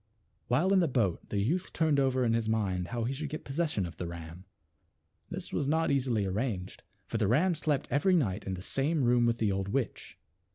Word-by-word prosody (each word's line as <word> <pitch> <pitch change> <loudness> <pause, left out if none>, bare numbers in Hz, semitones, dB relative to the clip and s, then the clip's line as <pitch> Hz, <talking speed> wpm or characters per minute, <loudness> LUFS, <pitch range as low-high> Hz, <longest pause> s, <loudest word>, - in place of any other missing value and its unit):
While 165 +11 +3
in 195 - +5
the 170 - +3
boat 115 - 0
the 100 - -1
youth 165 - -1
turned 155 -4 +2
over 130 -2 +2
in 115 - +2
his 115 -1 0
mind 95 -5 0
how 120 +2 -3
he 125 +4 -1
should 145 +2 -4
get 155 - -6
possession 140 - -1
of 85 - -8
the 85 - -4
ram. 85 +2 -8 0.8
This - - -7
was 140 - 0
not 160 +1 +2
easily 125 -7 +1
arranged, 95 -1 -3 0.2
for 115 - -3
the 105 - +2
ram 160 - +3
slept 150 -3 -1
every 185 +6 +3
night 105 - 0
in 95 - -1
the 90 - -8
same 145 +5 0
room 120 -1 +4
with 115 0 +1
the 110 -3 +1
old 95 0 -1
witch. 120 +3 -3
120 Hz, 215 wpm, -30 LUFS, 100-145 Hz, 0.8 s, in